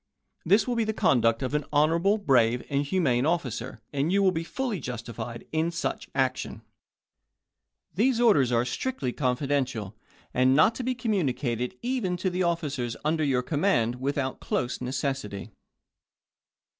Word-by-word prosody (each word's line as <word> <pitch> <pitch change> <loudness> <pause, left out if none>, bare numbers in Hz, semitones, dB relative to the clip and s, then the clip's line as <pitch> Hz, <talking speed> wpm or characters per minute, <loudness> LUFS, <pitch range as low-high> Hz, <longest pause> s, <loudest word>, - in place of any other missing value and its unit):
This 200 +8 +3
will 245 - 0
be 230 - +2
the 220 -1 -2
conduct 115 -1 +3
of 130 - -2
an 150 0 +1
honorable, 165 +7 +3
brave, 125 - +2
and 140 0 +1
humane 140 -6 +1
officer, 130 -7 -2
and 145 +4 0
you 200 +1 +3
will 190 - +5
be 165 -1 -2
fully 235 +2 -3
justified 115 -2 -6
in 160 +1 +1
such 170 0 -3
action. 130 -1 -1 1.3
These 235 +5 +2
orders 150 - +4
are 120 0 +2
strictly 135 - -2
Floyd - - -17
to - - -10
confidential, 125 -5 -1 0.4
and 130 +1 +4
not 155 +10 +5
to 250 - -5
be 255 +1 -1
communicated 135 - -1
even 240 -8 -1
to 185 +1 -1
the 180 - -3
Dec.2u°6o. 180 - +3
officers 140 -8 -2
under 155 +1 +1
your 130 -3 +1
command 125 - +1
without 135 -1 -1
close 125 +1 -2
necessity. 125 -5 -3
140 Hz, 155 wpm, -27 LUFS, 125-180 Hz, 1.3 s, will